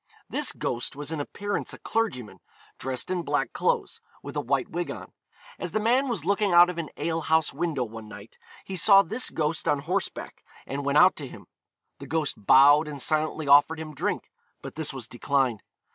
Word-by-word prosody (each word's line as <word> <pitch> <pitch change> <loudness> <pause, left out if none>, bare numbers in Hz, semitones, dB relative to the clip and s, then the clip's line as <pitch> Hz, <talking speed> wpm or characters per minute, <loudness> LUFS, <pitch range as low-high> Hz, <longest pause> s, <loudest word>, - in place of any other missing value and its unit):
This - - +1
ghost 120 +2 -4
was 145 +2 -6
in 160 - -3
appearance 205 +7 -4
a - - -13
clergyman, 125 - -3 0.4
dressed 130 +5 -3
in 180 -1 0
black - - -1
clothes, 460 -1 -1 0.2
with - - -8
a - - 0
white - - 0
wig - - -4
on. - - -8 0.5
As - - -5
the 215 - +1
man 245 +6 +2
was 200 -11 -2
looking 200 +1 +1
out 175 +1 +7
of 170 - -7
an 160 - -4
ale 165 +2 -2
house 160 0 +1
window 150 -3 -1
one 110 -1 -9
night, 105 +1 -13 0.3
he 195 - -6
saw 195 +2 +6
this 225 +9 -2
ghost 155 0 -2
on 145 - +3
horseback, 180 +7 -4 0.2
and 140 +1 -4
went 140 +1 +1
out 180 +4 +6
to 145 - -6
him. - - -12 0.5
The 140 - -9
ghost 150 -7 -2
bowed 145 +3 +7
and 145 -2 -7
silently 155 +1 -1
offered 145 +3 +5
him 155 -1 -7
drink; 140 - -3 0.3
but - - -7
this 160 -1 -2
was 130 -4 -6
declined. 125 -3 0
155 Hz, 195 wpm, -26 LUFS, 140-180 Hz, 0.5 s, out